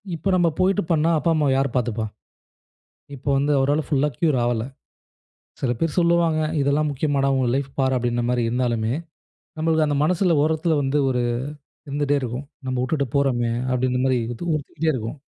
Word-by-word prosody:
இப்ப 175 Hz, +5 st, -1 dB
நம்ம 175 Hz, -2 st, +3 dB
போயிட்டு 195 Hz, +2 st, +2 dB
பண்ணா 160 Hz, +1 st, +3 dB
அப்பா 165 Hz, +2 st, +1 dB
அம்மாவை 150 Hz, -3 st, +2 dB
யார் 135 Hz, -2 st, 0 dB
பார்த்துப்பா? 115 Hz, -3 st, 0 dB, 1.1 s
இப்போ 140 Hz, +2 st, -5 dB
வந்து 145 Hz, +2 st, +1 dB
அவரால் 145 Hz, +3 st, +1 dB
ஃபுல்அ 145 Hz, +1 st, +2 dB
கியூர் 155 Hz, -6 st, +2 dB
ஆகல 120 Hz, -2 st, 0 dB, 1.0 s
சில 130 Hz, -, +1 dB
பேர் 165 Hz, +1 st, -1 dB
சொல்லுவாங்க 170 Hz, -2 st, +3 dB, 0.2 s
இதெல்லாம் 145 Hz, +2 st, +1 dB
முக்கியமாடா? 140 Hz, -1 st, 0 dB
உன் 125 Hz, -2 st, +1 dB
லைஃப் 140 Hz, 0 st, -2 dB
பார் 130 Hz, -1 st, +2 dB
அப்டின்ற 120 Hz, 0 st, -1 dB
மாரி 125 Hz, -1 st, +1 dB
இருந்தாலுமே, 120 Hz, -2 st, 0 dB, 0.7 s
நம்மளுக்கு 160 Hz, -1 st, +2 dB
அந்த 145 Hz, -, 0 dB
மனசில 175 Hz, -1 st, +2 dB
ஓரத்தில 160 Hz, +1 st, +1 dB
வந்து, 135 Hz, +2 st, 0 dB
ஒரு 125 Hz, -1 st, 0 dB, 0.7 s
இருந்துட்டே 145 Hz, 0 st, 0 dB
இருக்கும். 125 Hz, +3 st, -4 dB, 0.2 s
நம்ம 130 Hz, -1 st, -1 dB
உட்டுட்டு 140 Hz, 0 st, -1 dB
போறோமே 120 Hz, -4 st, +1 dB, 0.2 s
அப்டின்ற 125 Hz, 0 st, 0 dB
மாரி 130 Hz, -2 st, +2 dB, 0.2 s
இதுவும் 170 Hz, +7 st, -3 dB
உறுத்திக்கிட்டே 155 Hz, +2 st, -1 dB
இருக்கும். 115 Hz, +3 st, -5 dB
140 Hz, 160 wpm, -23 LUFS, 125-155 Hz, 1.1 s, நம்ம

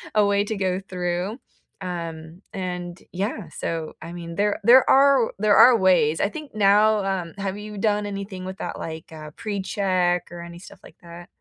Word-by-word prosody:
a 210 Hz, -1 st, +5 dB
way 200 Hz, 0 st, +2 dB
to 220 Hz, -, -3 dB
go 185 Hz, -1 st, 0 dB
through, 180 Hz, +2 st, -3 dB, 0.4 s
um, 165 Hz, -2 st, -6 dB
and 180 Hz, -2 st, -5 dB
yeah, 195 Hz, -1 st, -3 dB
so, 160 Hz, 0 st, -4 dB
I 165 Hz, +2 st, -8 dB
mean, 170 Hz, -1 st, -7 dB
there 205 Hz, +2 st, 0 dB
there 245 Hz, +4 st, +6 dB
are 275 Hz, -3 st, +5 dB
there 210 Hz, 0 st, +4 dB
are 245 Hz, -2 st, +8 dB
ways. 170 Hz, -6 st, +3 dB
I 200 Hz, -, +2 dB
think 300 Hz, -1 st, -9 dB
now, 210 Hz, +1 st, +4 dB
um, 185 Hz, -4 st, -3 dB
have 195 Hz, 0 st, -3 dB
you 210 Hz, 0 st, -8 dB
done 210 Hz, 0 st, 0 dB
anything 195 Hz, -2 st, -6 dB
with 190 Hz, 0 st, -6 dB
that, -, -, -5 dB
like, 160 Hz, 0 st, -7 dB
uh, 155 Hz, -1 st, -9 dB
precheck 190 Hz, -3 st, -1 dB
or 175 Hz, -, -8 dB
any 170 Hz, 0 st, -10 dB
stuff -, -, -14 dB
like -, -, -15 dB
that? 170 Hz, 0 st, -11 dB
190 Hz, 185 wpm, -23 LUFS, 175-205 Hz, 0.4 s, are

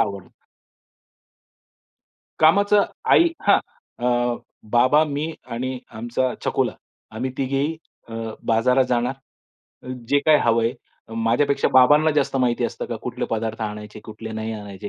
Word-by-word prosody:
आवडतं. 100 Hz, -3 st, -2 dB, 2.1 s
कामाचं 200 Hz, +6 st, +5 dB, 0.3 s
आई 340 Hz, -, +6 dB, 0.2 s
हां, -, -, +7 dB, 0.4 s
अ, 120 Hz, 0 st, +1 dB, 0.3 s
बाबा, 130 Hz, +6 st, +5 dB
मी 150 Hz, +2 st, -3 dB, 0.2 s
आणि 130 Hz, +2 st, -3 dB, 0.2 s
आमचा 120 Hz, +3 st, -1 dB
छकुला -, -, 0 dB, 0.4 s
आम्ही 130 Hz, +3 st, -3 dB
तिघेही 140 Hz, +4 st, -1 dB, 0.3 s
अ, 115 Hz, -, -10 dB, 0.3 s
बाजारात 125 Hz, +4 st, +3 dB
जाणार. 125 Hz, +1 st, +1 dB, 1.0 s
जे 145 Hz, +2 st, +4 dB
काही 155 Hz, -1 st, +6 dB
हवंय 115 Hz, 0 st, +2 dB, 0.4 s
माझ्यापेक्षा 120 Hz, +5 st, +1 dB
बाबांना 145 Hz, +5 st, +6 dB
जास्त 140 Hz, -1 st, +1 dB
माहिती 125 Hz, -2 st, +1 dB
असतं -, -, -4 dB
का -, -, -4 dB
कुठले -, -, -3 dB
पदार्थ 115 Hz, 0 st, -2 dB
आणायचे 105 Hz, 0 st, -6 dB
कुठले 110 Hz, +1 st, -8 dB
नाही 110 Hz, 0 st, -4 dB
आणायचे, 100 Hz, -2 st, -7 dB
120 Hz, 120 wpm, -22 LUFS, 115-140 Hz, 2.1 s, हां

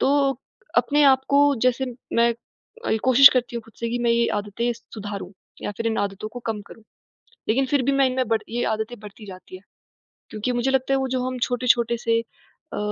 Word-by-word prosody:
तो 275 Hz, -1 st, +2 dB, 0.4 s
अपने 285 Hz, +5 st, +3 dB
आप 265 Hz, -1 st, +5 dB
को, 285 Hz, 0 st, +4 dB
जैसे 255 Hz, +2 st, +1 dB, 0.3 s
मैं 235 Hz, 0 st, +3 dB, 0.5 s
अल 220 Hz, -, +1 dB
कोशिश 260 Hz, +2 st, +9 dB
करती 245 Hz, -2 st, -1 dB
हूँ 230 Hz, -, -5 dB
ख़ुद 225 Hz, -, -19 dB
से 235 Hz, -, -1 dB
कि 245 Hz, -, -1 dB
मैं 235 Hz, -, +2 dB
ये 235 Hz, 0 st, +3 dB
आदतें 205 Hz, +4 st, -2 dB
सुधारूँ, 205 Hz, -4 st, -8 dB, 0.3 s
या -, -, -3 dB
फिर 230 Hz, -, -3 dB
इन 220 Hz, -, 0 dB
आदतों 200 Hz, +1 st, -3 dB
को 245 Hz, +2 st, -9 dB
कम 220 Hz, -2 st, -2 dB
करूँ, 225 Hz, -, -14 dB, 0.7 s
लेकिन 265 Hz, +5 st, +2 dB
फिर 280 Hz, 0 st, +1 dB
भी 275 Hz, -, +1 dB
मैं 275 Hz, -1 st, +3 dB
इनमें 255 Hz, -2 st, -1 dB
बढ़ 225 Hz, -1 st, +1 dB
ये 240 Hz, +1 st, -2 dB
आदतें 220 Hz, +1 st, -4 dB
बढ़ती 210 Hz, +1 st, -12 dB
जाती 185 Hz, -1 st, -11 dB
हैं। 185 Hz, -, -13 dB, 0.7 s
क्योंकि 215 Hz, +4 st, -3 dB
मुझे 245 Hz, +2 st, 0 dB
लगता 265 Hz, 0 st, +1 dB
है, -, -, +3 dB
वो 265 Hz, -, -1 dB
जो 255 Hz, -1 st, -1 dB
हम 255 Hz, -1 st, -4 dB
छोटे-छोटे 240 Hz, -1 st, +1 dB
से 230 Hz, 0 st, +1 dB, 0.5 s
अ, -, -, -4 dB
240 Hz, 210 wpm, -23 LUFS, 220-260 Hz, 0.7 s, कोशिश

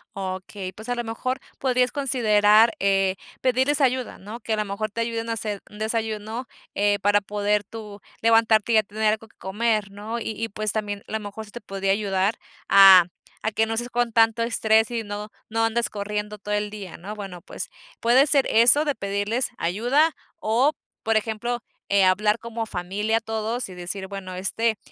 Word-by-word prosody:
Okey, 190 Hz, 0 st, -5 dB
pues, 220 Hz, +5 st, -10 dB
a 245 Hz, -, 0 dB
lo 240 Hz, -, -2 dB
mejor 255 Hz, +3 st, -3 dB, 0.2 s
podrías 250 Hz, -1 st, +1 dB
considerar, 225 Hz, -5 st, +4 dB
eh, 195 Hz, -1 st, +2 dB, 0.3 s
pedirles 260 Hz, +4 st, +2 dB
ayuda, 255 Hz, -2 st, 0 dB
¿no? 215 Hz, +5 st, -9 dB
Que 225 Hz, -, -2 dB
a -, -, +3 dB
lo 210 Hz, -, +1 dB
mejor 205 Hz, +2 st, -3 dB
te 230 Hz, -, -3 dB
ayuden 230 Hz, 0 st, -2 dB
a -, -, 0 dB
hacer 210 Hz, -3 st, -3 dB
un 210 Hz, -, -12 dB
desayuno, 220 Hz, +1 st, -2 dB, 0.3 s
eh, 205 Hz, 0 st, +2 dB
para 205 Hz, +1 st, +3 dB
poder 205 Hz, 0 st, 0 dB
tú 210 Hz, -1 st, -9 dB, 0.2 s
levantarte 225 Hz, 0 st, +4 dB
y -, -, +5 dB
ya 215 Hz, -, +5 dB
tener 215 Hz, +1 st, 0 dB
algo 220 Hz, +1 st, -6 dB
que -, -, -30 dB
comer, 210 Hz, +1 st, -1 dB
¿no? 215 Hz, +4 st, -5 dB
Y 225 Hz, -, -4 dB
y, 225 Hz, -, -1 dB
pues 215 Hz, +1 st, -2 dB
también, 205 Hz, -2 st, -3 dB
a -, -, -11 dB
lo 220 Hz, -, 0 dB
mejor, 210 Hz, +1 st, -7 dB
se 210 Hz, -, -16 dB
te 240 Hz, -, -8 dB
podría 195 Hz, -1 st, -2 dB
ayudar 200 Hz, 0 st, 0 dB, 0.3 s
a 195 Hz, -2 st, +9 dB, 0.4 s
a 220 Hz, -, +1 dB
que 220 Hz, +1 st, +2 dB
no 225 Hz, -, -3 dB
estés 240 Hz, +2 st, -2 dB
con 240 Hz, -1 st, 0 dB
tanto 225 Hz, 0 st, +4 dB
estrés 220 Hz, -1 st, +3 dB
y 230 Hz, -1 st, -2 dB
no 205 Hz, 0 st, -6 dB, 0.2 s
no 225 Hz, +1 st, +1 dB
andes 235 Hz, +1 st, 0 dB
corriendo 210 Hz, 0 st, -4 dB
todo 210 Hz, 0 st, -5 dB
el 210 Hz, 0 st, 0 dB
día, 205 Hz, -4 st, -8 dB
¿no? 200 Hz, +5 st, -7 dB
Bueno, 195 Hz, -4 st, -8 dB
pues 205 Hz, -, -7 dB, 0.3 s
puede 250 Hz, +5 st, +5 dB
ser 275 Hz, -2 st, +4 dB
eso 245 Hz, +7 st, +6 dB
de 290 Hz, -, +1 dB
pedirles 205 Hz, +4 st, -1 dB
ayuda 245 Hz, -, +2 dB, 0.2 s
o 245 Hz, +3 st, +2 dB, 0.3 s
por 225 Hz, 0 st, +2 dB
ejemplo, 225 Hz, +2 st, -2 dB, 0.3 s
eh, 200 Hz, -1 st, +4 dB
hablar 210 Hz, +4 st, +3 dB
como 230 Hz, 0 st, -4 dB
familia 205 Hz, +3 st, -1 dB
todos 225 Hz, +2 st, -3 dB
y 185 Hz, -, -10 dB
decir 185 Hz, +2 st, -5 dB
bueno, 195 Hz, -2 st, -7 dB
este, 220 Hz, +4 st, 0 dB
215 Hz, 195 wpm, -24 LUFS, 205-230 Hz, 0.4 s, a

